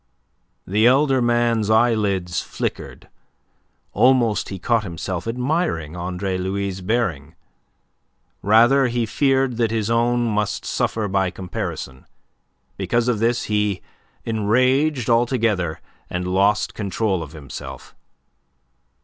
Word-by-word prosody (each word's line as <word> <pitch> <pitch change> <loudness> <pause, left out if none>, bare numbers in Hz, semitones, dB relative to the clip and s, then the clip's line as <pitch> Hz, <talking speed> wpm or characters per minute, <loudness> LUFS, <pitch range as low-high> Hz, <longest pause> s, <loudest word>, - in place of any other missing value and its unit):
The 105 +5 +3
elder 135 0 +3
man's 120 -2 +1
eyelids 105 -6 +2
flickered. - - -5 0.9
Almost 120 -1 +3
he 95 - -5
caught 115 +5 +1
himself 90 +1 -5
admiring 125 - -1
Andre 90 +2 -3
Louis' 95 0 -3
bearing. 90 - -2 1.1
Rather, 120 +6 +5
he 120 -1 -1
feared 135 +1 +1
that 115 -2 +1
his 110 0 -1
own 120 +1 +2
must 105 -3 -1
suffer 110 -2 -1
by 95 -1 +1
comparison. 85 -7 -6 0.7
Because 120 0 0
of 120 -4 +1
this, 115 +2 +1
he 105 -2 -1 0.4
enraged 125 +5 +1
altogether, 115 -8 +1 0.3
and 90 0 -3
lost 100 +3 +2
control 100 -2 -1
of 80 -1 -8
himself. 75 -4 -9
110 Hz, 105 wpm, -21 LUFS, 95-120 Hz, 1.1 s, Rather